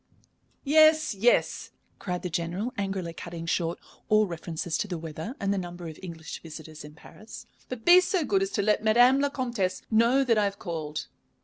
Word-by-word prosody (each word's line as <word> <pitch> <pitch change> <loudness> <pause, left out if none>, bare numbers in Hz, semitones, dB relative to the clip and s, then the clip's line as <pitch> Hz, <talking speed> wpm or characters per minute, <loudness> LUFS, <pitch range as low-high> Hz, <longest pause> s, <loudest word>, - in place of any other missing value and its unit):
"Yes, 310 0 +5
yes," 220 +5 +1 0.3
cried 180 -2 -4
the 180 - -3
General, 175 +9 -2
angrily 195 -4 -3
cutting 170 0 -7
short 165 0 -1 0.3
all 215 0 +5
references 170 -2 -4
to - - -1
the 180 -3 -4
weather 160 - -6
and 200 0 0
the 200 - -1
number 175 -1 -7
of 155 - -9
English 165 -3 -8
visitors 160 -1 -10
in 150 0 -12
Paris. 215 +7 -12 0.2
"But 255 -3 -7
be 355 +1 +8
so 360 -3 0
good 390 +3 +1
as 390 - 0
to 205 - 0
let 210 +1 +2
Madame 245 +5 +5
la 285 0 +1
Comtesse 235 -9 -2
know 235 +5 +4
that 230 -4 +2
I 210 - +2
have 200 0 -3
called." 155 -5 -5
195 Hz, 190 wpm, -27 LUFS, 170-245 Hz, 0.3 s, be